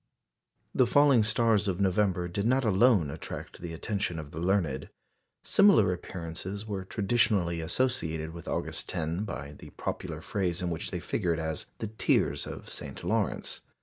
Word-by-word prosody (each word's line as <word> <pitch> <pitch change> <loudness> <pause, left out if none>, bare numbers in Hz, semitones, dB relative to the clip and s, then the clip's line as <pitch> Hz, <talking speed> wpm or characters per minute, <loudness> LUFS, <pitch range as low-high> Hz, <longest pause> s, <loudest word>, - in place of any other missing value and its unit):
The 125 - +4
falling 140 -2 +5
stars 110 -1 +3
of 95 -1 -1
November 95 -2 +2
did 100 +5 -1
not 130 +1 +3
alone 100 - +4
attract 80 - -7
the 85 -1 -5
attention 95 +1 -2
of 75 -2 -7
the 80 - -6
learned. 85 -7 0 0.5
Similar 200 - +5
appearances 90 +3 -6
were 100 -3 -3
traditionally 95 -4 +1
associated 80 -6 -1
with 85 -1 -10
August - - -2
10 85 +5 -2
by 70 -8 -6
the 75 - -12
popular - - -4
phrase 90 -4 -1
in 90 -1 -2
which 80 - -3
they - - -3
figured 85 -2 -1
as 80 -1 -3
"the - - -4
tears 110 +1 +1
of - - -7
St. - - -6
Lawrence." - - -1
95 Hz, 155 wpm, -29 LUFS, 85-110 Hz, 0.5 s, falling